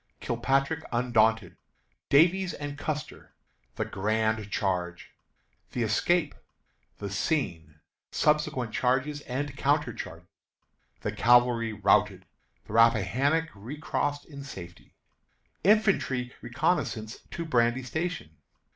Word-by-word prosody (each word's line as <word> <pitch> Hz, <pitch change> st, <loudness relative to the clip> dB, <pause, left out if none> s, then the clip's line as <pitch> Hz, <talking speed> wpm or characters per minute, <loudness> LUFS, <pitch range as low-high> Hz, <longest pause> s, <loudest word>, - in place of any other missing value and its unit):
Kilpatrick 135 Hz, +6 st, 0 dB
Undaunted. 115 Hz, -2 st, +2 dB, 0.5 s
Davies 180 Hz, +6 st, +4 dB
and 145 Hz, -1 st, -5 dB
Custer. 150 Hz, +1 st, -5 dB, 0.4 s
The -, -, -2 dB
Grand 110 Hz, +1 st, -1 dB
Charge. 90 Hz, -3 st, -2 dB, 0.6 s
The 120 Hz, -, 0 dB
Escape. 150 Hz, -, +1 dB, 0.6 s
The 100 Hz, -2 st, -5 dB
Scene. 85 Hz, -, -2 dB, 0.3 s
Subsequent 150 Hz, -6 st, +1 dB
Charges 130 Hz, +4 st, 0 dB
and 135 Hz, +2 st, -3 dB
Counter -, -, +1 dB
charges. -, -, -8 dB, 0.7 s
The -, -, -2 dB
Cavalry 120 Hz, -2 st, +4 dB
Routed. 100 Hz, -1 st, +2 dB, 0.4 s
The -, -, -10 dB
Rappahannock 115 Hz, -, +3 dB
Recrossed 145 Hz, +5 st, -3 dB
in 140 Hz, -3 st, -10 dB
Safety. 85 Hz, -10 st, -11 dB, 0.7 s
Infantry 190 Hz, -, +2 dB
Reconnoissance 120 Hz, -4 st, -1 dB
to 170 Hz, -, -5 dB
Brandy 120 Hz, -3 st, +2 dB
Station. 160 Hz, -, -4 dB
125 Hz, 95 wpm, -28 LUFS, 110-145 Hz, 0.7 s, Davies